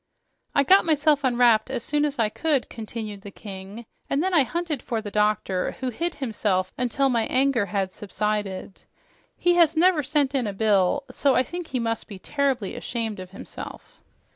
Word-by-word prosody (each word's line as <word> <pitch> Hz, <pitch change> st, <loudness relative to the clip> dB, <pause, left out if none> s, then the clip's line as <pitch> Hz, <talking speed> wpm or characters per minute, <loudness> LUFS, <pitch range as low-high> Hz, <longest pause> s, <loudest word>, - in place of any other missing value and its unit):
"I 280 Hz, -, +5 dB
got 380 Hz, +7 st, +6 dB
myself 300 Hz, -2 st, +2 dB
unwrapped 240 Hz, -3 st, +4 dB
as 250 Hz, -3 st, -3 dB
soon 295 Hz, +2 st, +1 dB
as 290 Hz, -1 st, -3 dB
I 225 Hz, -3 st, +3 dB
could," 295 Hz, +2 st, 0 dB
continued 220 Hz, -3 st, -6 dB
the 200 Hz, -, -9 dB
King, 200 Hz, +3 st, -9 dB, 0.2 s
"and 280 Hz, +3 st, +1 dB
then 375 Hz, 0 st, 0 dB
I 325 Hz, -, +6 dB
hunted 315 Hz, 0 st, -2 dB
for 235 Hz, -3 st, -2 dB
the 210 Hz, -2 st, -6 dB
doctor, 210 Hz, -3 st, +1 dB
who 260 Hz, -, -1 dB
hid 340 Hz, +8 st, -3 dB
himself 205 Hz, -7 st, -1 dB
until 250 Hz, +2 st, +1 dB
my 235 Hz, -4 st, +1 dB
anger 255 Hz, -5 st, +2 dB
had 195 Hz, -2 st, -1 dB
subsided. 205 Hz, -2 st, -3 dB, 0.6 s
He 350 Hz, -, +3 dB
has 335 Hz, -2 st, +4 dB
never 345 Hz, -1 st, +4 dB
sent 285 Hz, 0 st, +1 dB
in 255 Hz, -5 st, 0 dB
a 205 Hz, -, -3 dB
bill, 205 Hz, +5 st, +2 dB
so 275 Hz, -2 st, +2 dB
I 255 Hz, -, +4 dB
think 345 Hz, +5 st, -6 dB
he 255 Hz, -, -2 dB
must 230 Hz, -1 st, -2 dB
be 200 Hz, -, -8 dB
terribly 265 Hz, -1 st, -1 dB
ashamed 225 Hz, -4 st, -3 dB
of 185 Hz, -1 st, -8 dB
himself." 195 Hz, -, -10 dB
240 Hz, 185 wpm, -25 LUFS, 210-285 Hz, 0.6 s, got